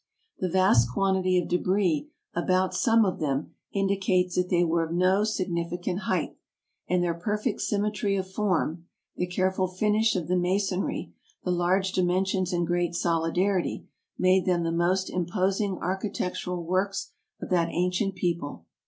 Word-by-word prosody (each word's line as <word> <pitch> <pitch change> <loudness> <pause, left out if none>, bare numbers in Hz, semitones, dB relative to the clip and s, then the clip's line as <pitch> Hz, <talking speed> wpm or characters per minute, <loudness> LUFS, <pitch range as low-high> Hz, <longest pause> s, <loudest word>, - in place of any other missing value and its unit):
The 185 - -1
vast 165 -11 +4
quantity 190 +3 +2
of 175 - 0
debris 185 - +1 0.2
about 185 +2 +1
some 230 -3 +4
of 185 - -2
them 145 -2 -2 0.2
indicates 190 -2 +1
that 180 0 0
they 175 -1 +3
were 165 0 +1
of 165 - -5
no 185 +4 +3
significant 180 -3 -2
height, - - -1 0.5
and 180 0 +2
their 170 -1 +1
perfect 210 +6 -2
symmetry 205 -1 0
of 190 -1 -2
form, 180 -4 -1 0.3
the 180 - -1
careful 185 +1 0
finish 210 +4 +1
of 175 -4 -2
the 180 - +1
masonry, 190 +1 -1 0.3
the 180 - -1
large 180 +2 +1
dimensions 185 +1 +1
and 175 -1 0
great 175 0 0
solidity, 175 +3 0 0.3
made 185 0 +3
them 175 -2 +2
the 165 - 0
most 180 +3 +1
imposing 190 +2 -1
architectural 180 -2 -3
works 190 +3 -1 0.3
of - - -7
that 170 -2 +2
ancient 180 +3 0
people. 170 - -3
185 Hz, 145 wpm, -27 LUFS, 175-195 Hz, 0.5 s, vast